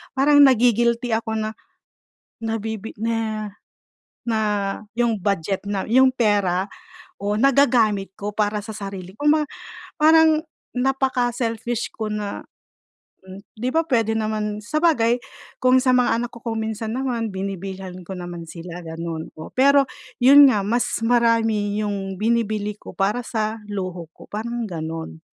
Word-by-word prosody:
parang 290 +2 +5
nagi-guilty 240 -1 +3
ako 220 0 -1
na, 215 0 -1 0.9
nabibi 220 -1 -4
na 220 -2 -2 0.8
na, 225 - +1 0.6
yung 235 -2 +2
budget 195 0 -1
na, 200 0 -3
yung 260 +3 +5
pera 205 -5 +1 0.5
o 205 +1 -1
nagagamit 230 -6 +3
ko 205 0 -4
para 210 0 0
sa 220 - -7
sarili, 195 -3 -7
kumba 300 +1 +3 0.5
parang 315 0 +5 0.3
napaka-selfish 245 -3 0
ko 220 -1 -3
na 210 -1 -4 1.1
'di 245 +4 -1
ba 325 0 +1
puwede 225 -5 +2
naman 215 -1 -2
sabagay 240 -1 +2 0.4
kung 255 0 +5
sa 255 -1 +3
mga 250 -2 +3
anak 240 - -2
ko 235 - -13
kung 225 -2 -2
minsan 220 0 -3
naman 240 -4 -2
binibilhan 190 -1 -6
ko 190 - -7
naman 175 -1 -7
sila 175 +1 -8
ganon, 165 0 -5
oh. 155 - -7
Pero 275 +1 +5 0.3
yun 280 +3 +9
nga 210 - +1
mas 235 +4 +1 0.2
marami 225 -3 +2
yung 195 -2 -3
binibili 215 -2 0
ko - - -10
para 205 +5 0
sa 220 -2 -2
luho 185 -4 -4
ko - - -14
parang 230 +2 -4
ganon. 160 -1 -6
220 Hz, 135 wpm, -22 LUFS, 200-245 Hz, 1.1 s, yun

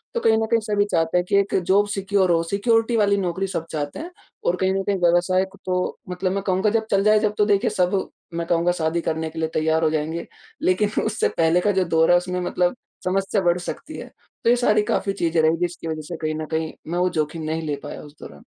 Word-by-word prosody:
तो - - +2
कहीं 220 0 +4
न 225 - +1
कहीं 230 - +4
सभी 205 -1 +1
चाहते 165 +1 +1
हैं 180 - +1
कि - - +2
एक 200 - -1
जॉब 200 +2 +4
सिक्योर 195 -2 +1
हो, 165 -1 +3
सिक्योरिटी 225 +5 +1
वाली 200 -1 +3
नौकरी 190 +1 -1
सब 165 -3 -3
चाहते 145 - -4
हैं 340 +3 -7 0.3
और 175 - +2
कहीं 190 0 +2
न 195 0 -1
कहीं 200 -1 0
व्यवसाय 175 +2 +3
क - - -15
तो 180 0 -1
मतलब 185 +1 -2
मैं 195 0 -2
कहूँगा 190 +2 +1
जब 225 -1 +1
चल 195 0 +3
जाए 215 0 +5
तब 210 -1 +1
तो 210 - +5
देखिए, 200 -2 +2
सब 185 +1 0 0.2
मैं 170 0 -3
कहूँगा 170 +1 +2
शादी 160 +2 0
करने 160 0 -2
के 160 - -7
लिए 160 - 0
तैयार 160 +1 +1
हो 155 - +4
जाएँगे, 160 +2 -2 0.4
लेकिन 205 +3 +1
उससे 220 0 0
पहले 165 +2 +3
का 205 - +2
जो 190 -1 +2
दौर 165 +2 +5
है 175 - +7
उसमें 180 0 -2
मतलब 180 +3 0 0.3
समस्या 195 +2 0
बढ़ 175 0 +3
सकती 175 - -7
है। - - -9 0.3
तो 230 - +3
ये - - +5
सारी 215 -3 +3
काफ़ी 195 -1 0
चीज़ें 165 -4 +1
रहीं 160 +1 +3
जिसकी 175 -1 -3
वज़ह 155 -1 -3
से 170 - -5
कहीं 155 -1 -2
न - - -4
कहीं 160 0 -2 0.2
मैं 175 - 0
वो 180 0 +2
जोखिम 155 +2 -2
नहीं 160 +1 -2
ले 145 - -1
पाया 145 - -7
उस 150 0 -14
दौरान। 70 - -12
180 Hz, 250 wpm, -22 LUFS, 165-200 Hz, 0.4 s, है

